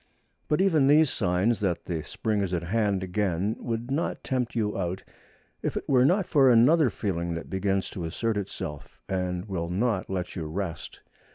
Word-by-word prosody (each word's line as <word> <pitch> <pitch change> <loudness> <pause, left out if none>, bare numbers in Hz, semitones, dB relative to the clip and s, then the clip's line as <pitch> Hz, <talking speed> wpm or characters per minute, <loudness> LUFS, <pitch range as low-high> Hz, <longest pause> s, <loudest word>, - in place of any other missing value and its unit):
But 150 +4 +2
even 160 -8 +4
these 150 0 +5
signs 95 +4 +1
that 95 -5 -1
the 85 -3 -2
spring 105 +6 -2
is 95 -2 -1
at 85 - -2
hand 100 0 0
again 95 +2 -1
would 120 +2 -4
not 155 +5 -1
tempt 125 -3 -2
you 105 -3 0
out 95 0 -3 0.6
if - - -2
it - - -5
were 130 -2 +4
not 185 +5 +3
for 140 -6 +4
another 125 +5 +5
feeling 85 -6 -2
that 85 - -7
begins 95 0 0
to 90 - -5
assert 110 +7 -1
itself, 75 -7 -6
and 90 -1 -2
will 85 -5 -3
not 100 +2 0
let 90 -2 -3
you 80 -3 -4
rest. 85 0 -5
100 Hz, 180 wpm, -27 LUFS, 90-120 Hz, 0.6 s, these